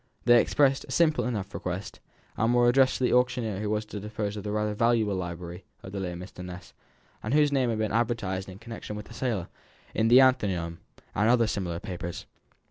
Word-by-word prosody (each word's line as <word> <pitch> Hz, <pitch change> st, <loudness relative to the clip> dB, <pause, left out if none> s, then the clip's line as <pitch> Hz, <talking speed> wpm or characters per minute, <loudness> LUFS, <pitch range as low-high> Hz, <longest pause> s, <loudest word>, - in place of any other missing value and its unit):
They 120 Hz, -1 st, +7 dB
expressed 135 Hz, -2 st, +2 dB
a -, -, -10 dB
simple 160 Hz, -2 st, +3 dB
enough 105 Hz, -6 st, -3 dB
request, 90 Hz, +2 st, -5 dB, 0.4 s
and 115 Hz, +2 st, +2 dB
were 120 Hz, 0 st, +5 dB
addressed 130 Hz, +2 st, +4 dB
to -, -, -3 dB
the 125 Hz, -, +3 dB
auctioneer 120 Hz, -5 st, +1 dB
who 105 Hz, 0 st, -2 dB
was 105 Hz, 0 st, -1 dB
to 105 Hz, -1 st, -7 dB
dispose 105 Hz, 0 st, -4 dB
of 105 Hz, -, -6 dB
the 105 Hz, -, -3 dB
rather 105 Hz, 0 st, 0 dB
valuable 115 Hz, -1 st, +2 dB
library 90 Hz, 0 st, -5 dB, 0.2 s
of 95 Hz, -, -8 dB
the 100 Hz, -, -4 dB
late 90 Hz, -2 st, -3 dB
Mr. 90 Hz, +1 st, -9 dB
Ness, 90 Hz, -1 st, -9 dB, 0.5 s
and 110 Hz, +6 st, -1 dB
whose 150 Hz, -1 st, +4 dB
name 130 Hz, -3 st, +2 dB
had 115 Hz, -, -1 dB
been 110 Hz, -1 st, -1 dB
advertised 105 Hz, -5 st, -1 dB
in 95 Hz, -, -9 dB
connection 115 Hz, -1 st, -7 dB
with 105 Hz, 0 st, -7 dB
the -, -, -10 dB
sale, 115 Hz, -7 st, -2 dB, 0.5 s
in 110 Hz, -, +2 dB
the 120 Hz, +3 st, +8 dB
Athenaeum, 95 Hz, -11 st, +2 dB, 0.3 s
and 105 Hz, +3 st, +2 dB
other 120 Hz, -1 st, +4 dB
similar 90 Hz, -6 st, -2 dB
papers. 85 Hz, -3 st, -6 dB
105 Hz, 210 wpm, -27 LUFS, 95-120 Hz, 0.5 s, the